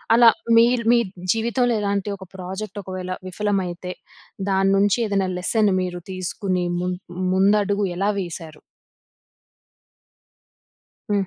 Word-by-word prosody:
అలా 235 0 +7 0.3
మీరు, 235 +1 +4
మీ 240 - +6 0.3
జీవితంలో 235 +2 +1
ఇలాంటి 200 0 -1
ఒక 190 - -10
ప్రాజెక్ట్ 190 +3 -6
ఒకవేళ 185 -1 -6 0.2
విఫలమైతే 185 -2 -2 0.6
దాన్నుంచి 195 +1 +3
ఏదైనా 200 -2 0
లెసన్ 210 +3 +2
మీరు 180 -1 -4
తీసుకుని 185 0 -2 0.2
ముం 180 0 -1 0.4
ముందడుగు 200 +1 +3
ఎలా 200 +2 +1
వేశారు? 165 -4 -7 2.5
హ్మ్. 200 -2 +1
195 Hz, 100 wpm, -22 LUFS, 185-210 Hz, 2.5 s, అలా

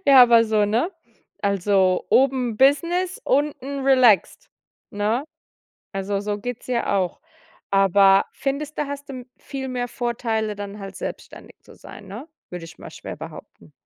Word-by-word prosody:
Ja, 270 -2 +9
aber 235 -1 +6
so, 215 -2 +2
ne? 230 - 0 0.5
Also, 195 -2 +2
oben 255 -4 +2
Business, 345 +8 +2
unten 280 -1 -1
relaxt, 250 -8 +4 0.4
ne? 215 +6 -1 0.7
Also 195 +1 -2
so 205 0 -3
geht's 245 +2 -6
ja 235 -4 0
auch. 185 -2 -2 0.5
Aber 195 0 +5
findest 285 +2 -4
du, 295 - 0
hast 285 0 -7
du 255 -3 -7
viel 265 -2 -6
mehr 245 -1 -3
Vorteile, 225 -3 -2
dann 205 0 -7
halt 195 -1 -8
selbstständig - - -8
zu - - -17
sein, 205 - -13
ne? 225 +11 -9 0.2
Würde 180 -2 -7
ich 165 - -13
mal - - -10
schwer - - -8
behaupten. - - -12
235 Hz, 145 wpm, -23 LUFS, 200-270 Hz, 0.7 s, Ja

